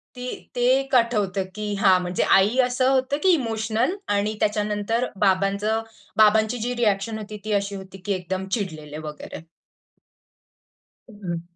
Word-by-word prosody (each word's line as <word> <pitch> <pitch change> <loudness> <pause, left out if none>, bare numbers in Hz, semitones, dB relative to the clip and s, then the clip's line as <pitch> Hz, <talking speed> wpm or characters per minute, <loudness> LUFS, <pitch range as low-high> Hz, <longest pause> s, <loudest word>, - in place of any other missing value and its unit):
ते 250 0 -7 0.3
ते 245 - -2 0.2
1 270 0 -2
आठवतं 210 -5 +2
की 210 -1 -3
हा, 190 -3 +5
म्हणजे 180 0 -1
आई 205 +6 +2
असं 255 +1 +1
होतं 265 +2 +1
की 380 - +4
इमोशनल 225 - 0 0.2
आणि 210 +2 0
त्याच्यानंतर 210 +3 0 0.2
बाबांचं 200 +3 +1 0.4
बाबांची 220 +2 +4
जी 245 +3 -2
रिॲक्शन 220 -1 0
होती, 210 0 -7
ती 215 - -3
अशी 200 0 -1
होती 190 0 -9
की 205 - 0
एकदम 185 +1 -4
चिडलेले 155 -8 -4
वगैरे. 150 +1 -8 1.7
हम्म. 185 -6 -5
210 Hz, 140 wpm, -23 LUFS, 195-230 Hz, 1.7 s, हा